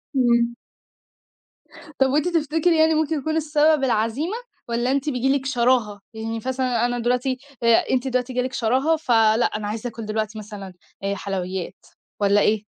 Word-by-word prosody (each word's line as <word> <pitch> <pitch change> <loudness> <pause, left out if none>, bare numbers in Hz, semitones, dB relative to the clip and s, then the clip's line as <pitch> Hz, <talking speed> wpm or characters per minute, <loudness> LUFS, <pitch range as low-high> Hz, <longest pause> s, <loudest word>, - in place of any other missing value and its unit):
إمم. 235 -2 +2 1.4
طَب 265 0 +4
وأنتِ 300 +5 +1
تفتكري 325 0 +1
يعني 320 0 +5
ممكن 315 0 0
يكون 315 +3 -2
السبب 305 -1 +2
العزيمة؟ 250 - 0 0.3
والّا 240 +2 0
أنتِ 280 +2 0
بييجي 260 0 0
لِك 270 - -8
شراهه؟ 240 -5 +1
يعني 225 +1 -4
مثلًا 255 -2 0
أنا 245 0 -1
دلوقتي 250 +2 0 0.3
آآ، 235 -1 +4
أنتِ 260 0 +1
دلوقتي 255 0 -1
جاه 250 - +1
لِك 255 +1 -4
شراهه 260 +8 +2
ف 310 -6 -4
لأ 225 0 +4
أنا 210 -1 -2
عايزة 220 +3 -4
آكُل 225 -1 -8
دلوقتي 215 0 -3
مثلًا 200 -3 -9 0.3
آآ 200 0 -1
حلويات، 190 -2 -5 0.3
والّا 205 0 +3
إيه؟ 215 0 +2
245 Hz, 165 wpm, -23 LUFS, 220-275 Hz, 1.4 s, يعني